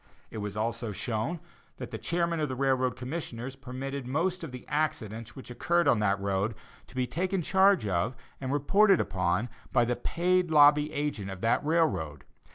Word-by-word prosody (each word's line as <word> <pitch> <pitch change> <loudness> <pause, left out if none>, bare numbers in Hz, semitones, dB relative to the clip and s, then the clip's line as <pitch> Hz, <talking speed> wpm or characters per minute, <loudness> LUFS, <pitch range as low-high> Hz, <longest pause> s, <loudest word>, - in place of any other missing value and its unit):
It 110 - -5
was 105 0 -5
also 115 +1 -2
shown 115 - -2 0.4
that - - -7
the - - -5
chairman 170 -1 0
of 150 -2 0
the 130 - -3
railroad 130 -1 +1
commissioners 130 -2 -5
permitted 135 0 -6
most 175 +7 -1
of 160 - -6
the 125 -1 -9
accidents 115 -7 -2
which 130 -2 -9
occurred 170 +7 +1
on 110 - +4
that 100 -1 +1
road 100 +2 -1 0.3
to - - -17
be 130 -1 +1
taken 185 +5 -1
charge 190 - +4
of 100 +5 0 0.3
and 130 -1 -3
reported 195 +7 +4
upon 95 +4 0 0.2
by 120 -2 +4
the 125 +1 0
paid 180 +4 +1
lobby 150 0 +6
agent 145 -9 -2
of 95 -1 -7
that 115 +5 +2
railroad. 145 - 0
130 Hz, 175 wpm, -29 LUFS, 110-160 Hz, 0.4 s, lobby